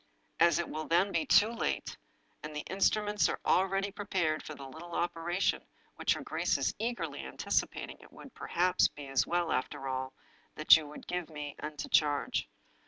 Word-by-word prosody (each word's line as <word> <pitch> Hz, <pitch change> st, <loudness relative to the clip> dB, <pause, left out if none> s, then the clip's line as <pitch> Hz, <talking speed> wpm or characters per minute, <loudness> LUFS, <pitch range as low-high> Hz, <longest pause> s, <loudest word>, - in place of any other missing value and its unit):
As 170 Hz, -, +5 dB
it 175 Hz, -, -1 dB
will 155 Hz, 0 st, -5 dB
then 180 Hz, +4 st, +3 dB
be 300 Hz, -, 0 dB
too 215 Hz, -3 st, +6 dB
late, 235 Hz, -, -2 dB, 0.5 s
and 150 Hz, 0 st, -7 dB
the 150 Hz, -, -4 dB
instruments 205 Hz, +2 st, +2 dB
are -, -, -3 dB
already 195 Hz, +2 st, +2 dB
prepared 185 Hz, -6 st, -1 dB
for 155 Hz, -, -8 dB
the 135 Hz, -1 st, -9 dB
little 165 Hz, +5 st, -9 dB
operation 175 Hz, +2 st, 0 dB, 0.3 s
which -, -, +2 dB
her -, -, -6 dB
grace -, -, 0 dB
is -, -, 0 dB
eagerly 235 Hz, +2 st, -3 dB
anticipating, -, -, -2 dB
it -, -, -17 dB
would, 275 Hz, -, -13 dB
perhaps, 180 Hz, +1 st, +2 dB
be 145 Hz, -, -10 dB
as 135 Hz, -1 st, +1 dB
well, 175 Hz, -1 st, 0 dB
after 130 Hz, +1 st, -2 dB
all, 130 Hz, 0 st, -3 dB, 0.4 s
that 155 Hz, -, +8 dB
you 150 Hz, -2 st, -2 dB
should -, -, -10 dB
give 180 Hz, -2 st, -3 dB
me 150 Hz, -2 st, -6 dB
into 150 Hz, -1 st, -5 dB
charge. 145 Hz, -2 st, +1 dB
170 Hz, 175 wpm, -31 LUFS, 150-195 Hz, 0.5 s, that